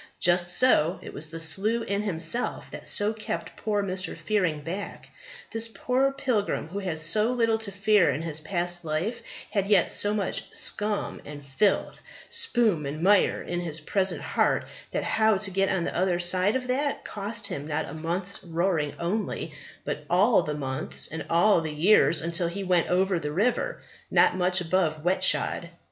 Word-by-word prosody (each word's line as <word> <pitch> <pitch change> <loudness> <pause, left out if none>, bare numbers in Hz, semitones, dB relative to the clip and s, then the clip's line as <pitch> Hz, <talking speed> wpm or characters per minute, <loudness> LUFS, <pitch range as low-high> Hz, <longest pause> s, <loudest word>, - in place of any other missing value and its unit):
Just 175 0 +3
so; 180 -4 +3
it - - -9
was 155 +2 -4
the 165 +1 -7
slough 205 +8 +1
in 200 +1 -1
himself 190 +3 0
that - - -8
so 205 +2 +1
kept 220 0 -5
poor 205 -2 -1
Mr. 185 0 -3
Fearing 180 -8 -1
back. 185 +7 -7 0.4
This 225 0 0
poor 255 +4 0
pilgrim, 255 - -2
who 195 +4 -4
had 180 -5 -3
so 210 +9 +3
little 230 -2 +1
to 220 -2 -3
fear 200 0 +3
in 155 - -2
his 160 -2 -2
past 175 +2 -2
life, 165 +9 -2 0.3
had 200 -2 0
yet 200 -4 +3
so 205 - +2
much 200 -3 -3
scum 210 0 -1
and 145 -1 -10
filth, 195 +10 0 0.3
spume 240 - +1
and 155 +4 -5
mire 200 +1 +3
in 175 0 -3
his 160 -2 -1
present 190 +5 0
heart, - - +1 0.2
that - - -2
how 220 -2 +2
to 195 0 0
get 195 +1 +1
on 190 -3 0
the - - -4
other 180 -1 +1
side 185 +4 +4
of 260 -1 -2
that 275 +3 -2
cost 210 +2 -4
him 150 -8 -5
not 150 -1 -2
a - - -8
month's 175 +5 -4
roaring 165 -3 -1
only, 175 -3 -3 0.3
but 150 0 -4
all 195 +4 +4
the 150 -3 -4
months 130 -2 -3
and 160 0 -6
all 175 +2 +4
the 160 -1 -4
years 165 +1 +4
till 170 0 +1
he 195 +4 -4
went 180 -3 +2
over 185 0 +1
the 150 -2 -4
River 245 - -1 0.3
not - - +4
much 185 0 +1
above 165 -3 0
wet 185 +2 +1
shod. - - +1
185 Hz, 180 wpm, -26 LUFS, 165-210 Hz, 0.4 s, side